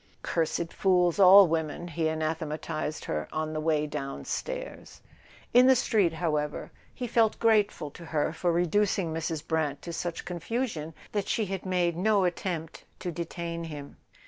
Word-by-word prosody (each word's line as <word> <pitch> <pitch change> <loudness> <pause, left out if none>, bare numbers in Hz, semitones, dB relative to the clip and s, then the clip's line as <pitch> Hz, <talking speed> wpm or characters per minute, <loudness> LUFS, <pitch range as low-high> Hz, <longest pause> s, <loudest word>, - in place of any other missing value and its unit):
"Cursed 165 0 -1
fools—all 185 +1 +6
women," 160 +1 -2
he 165 0 -1
anathematized 155 0 -3
her 75 0 -2
on 155 0 -2
the 155 - -2
way 155 -1 +1
downstairs. - - -5 0.5
In 250 +1 +7
the 265 - +7
street, 200 -8 +2
however, 150 -3 -2 0.2
he 250 - -5
felt 225 -2 +2
grateful 210 -9 +2
to 170 - -11
her 155 -1 -1
for 175 +1 0
re¬ 175 +1 +2
ducing 190 -2 +1
Mrs. 160 -1 -3
Brant 155 -3 -1
to 170 - -6
such 170 0 -4
confusion 175 -3 -3 0.2
that 205 -2 -2
she 220 - 0
had 195 -1 -5
made 175 -2 +1
no 200 +2 +3
attempt 175 -2 -3
to 180 - -4
detain 170 0 -5
him. 145 -3 -8
170 Hz, 150 wpm, -28 LUFS, 155-195 Hz, 0.5 s, In